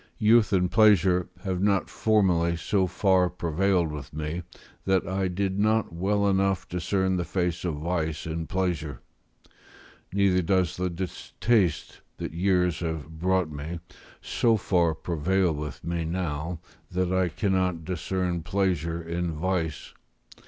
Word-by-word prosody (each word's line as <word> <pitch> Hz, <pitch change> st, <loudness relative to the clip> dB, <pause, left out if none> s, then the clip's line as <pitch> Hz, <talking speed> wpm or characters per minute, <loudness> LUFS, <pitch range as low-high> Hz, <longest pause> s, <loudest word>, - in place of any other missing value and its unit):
Youth 110 Hz, 0 st, +4 dB
and 90 Hz, -2 st, +2 dB
pleasure 95 Hz, -5 st, +4 dB
have 95 Hz, -2 st, -2 dB
not 100 Hz, -1 st, +2 dB
formerly 90 Hz, -6 st, +2 dB
so 95 Hz, +2 st, +1 dB
far 95 Hz, 0 st, +2 dB
prevailed 85 Hz, 0 st, 0 dB
with 75 Hz, -2 st, -8 dB
me, 80 Hz, +3 st, -3 dB, 0.4 s
that 95 Hz, -1 st, +2 dB
I 95 Hz, 0 st, 0 dB
did 95 Hz, +1 st, -1 dB
not 110 Hz, -3 st, +2 dB
well 100 Hz, +4 st, +1 dB
enough 95 Hz, -2 st, +1 dB
discern 95 Hz, +2 st, 0 dB
the 90 Hz, -, 0 dB
face 90 Hz, 0 st, -2 dB
of 85 Hz, -4 st, -1 dB
vice 80 Hz, 0 st, -2 dB
in 80 Hz, 0 st, -4 dB
pleasure; 85 Hz, -8 st, -2 dB, 1.1 s
neither 95 Hz, -1 st, +3 dB
does 90 Hz, -1 st, +1 dB
the 90 Hz, 0 st, -1 dB
distaste 95 Hz, +2 st, -1 dB, 0.2 s
that -, -, -5 dB
years 90 Hz, -2 st, +1 dB
have 80 Hz, -1 st, -5 dB
brought 90 Hz, -2 st, +1 dB
me, 75 Hz, +4 st, -5 dB, 0.4 s
so 115 Hz, -2 st, +2 dB
far 85 Hz, -5 st, +1 dB
prevail 90 Hz, +3 st, 0 dB
with 75 Hz, 0 st, -6 dB
me 85 Hz, 0 st, -2 dB
now, 80 Hz, -1 st, -3 dB, 0.3 s
that 90 Hz, 0 st, -1 dB
I 95 Hz, -1 st, +2 dB
cannot 90 Hz, -3 st, 0 dB
discern 90 Hz, 0 st, -2 dB
pleasure 85 Hz, -2 st, -1 dB
in 85 Hz, +1 st, -2 dB
vice. 80 Hz, -1 st, -2 dB
90 Hz, 135 wpm, -26 LUFS, 85-95 Hz, 1.1 s, Youth